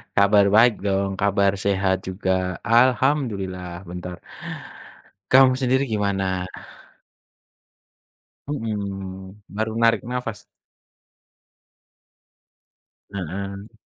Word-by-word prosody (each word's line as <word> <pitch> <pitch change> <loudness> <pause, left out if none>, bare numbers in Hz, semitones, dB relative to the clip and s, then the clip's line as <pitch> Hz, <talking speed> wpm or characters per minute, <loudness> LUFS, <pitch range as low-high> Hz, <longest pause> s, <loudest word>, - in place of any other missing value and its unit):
Kabar 100 0 +5
baik 115 +1 +7
dong, 95 0 0
kabar 100 -1 +3
sehat 95 -1 +1
juga. 95 -1 -1
Alhamdulillah. 115 -8 +1
Bentar. 90 0 -7 1.1
Kamu 130 0 +7
sendiri 130 +1 +1
gimana? 95 -4 -1 2.0
Mhm, 100 -6 -5
baru 110 +1 -1
narik 115 -2 +4
napas. 125 -4 -4 2.6
Heeh. 100 +2 -6
100 Hz, 70 wpm, -23 LUFS, 95-115 Hz, 2.6 s, baik